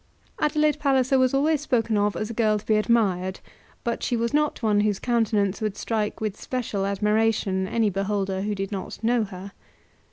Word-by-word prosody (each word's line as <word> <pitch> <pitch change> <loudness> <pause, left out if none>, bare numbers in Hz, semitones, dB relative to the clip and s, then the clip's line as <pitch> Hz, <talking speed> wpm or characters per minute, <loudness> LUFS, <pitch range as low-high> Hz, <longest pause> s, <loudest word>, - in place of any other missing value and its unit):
Adelaide 300 0 +2
Palliser 265 -2 +2
was 255 -1 +3
always 290 +2 +2
spoken 230 -6 0
of 205 0 +1
as 215 +1 -3
a - - -5
girl 215 -2 +2
to 205 - -9
be 215 - +2
admired; 200 -5 +1 0.4
but 235 -1 -2
she 240 - 0
was 235 +2 -1
not 300 -3 0
one 210 -2 +3
whose 205 -1 +1
countenance 220 -5 0
would 215 -2 -2
strike 215 -2 -2
with 215 -2 -4
special 220 -6 -2
admiration 210 -1 +1
any 220 0 +1
beholder 195 0 -1
who 205 +1 -2
did 195 0 -4
not 195 +2 -6
know 235 0 +2
her. 195 0 -9
215 Hz, 185 wpm, -25 LUFS, 200-240 Hz, 0.4 s, was